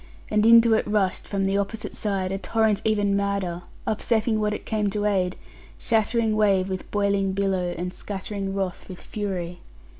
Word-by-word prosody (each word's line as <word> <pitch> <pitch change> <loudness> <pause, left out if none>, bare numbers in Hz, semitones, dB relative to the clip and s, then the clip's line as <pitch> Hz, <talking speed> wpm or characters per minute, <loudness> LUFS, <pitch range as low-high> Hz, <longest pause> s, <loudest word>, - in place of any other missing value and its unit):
And 210 +1 +3
into 230 0 +7
it 220 - +1
rushed, 205 -3 0
from 195 -1 -1
the 195 +1 +1
opposite 215 +2 -4
side, 195 -3 -1
a 195 - -2
torrent 220 -1 +1
even 205 -2 +2
madder; 200 -3 -1 0.2
upsetting 220 0 +1
what 210 0 +1
it 210 - -5
came 210 -2 0
to 205 +1 -2
aid; 185 -3 +1 0.4
shattering 225 0 +1
wave 195 -3 +3
with 185 -1 -5
boiling 200 -1 +1
billow, 190 -2 0
and 180 +2 -4
scattering 195 -1 -5
wrath 190 -1 -3
with 180 - -8
fury. 180 -4 -4
200 Hz, 170 wpm, -25 LUFS, 190-215 Hz, 0.4 s, into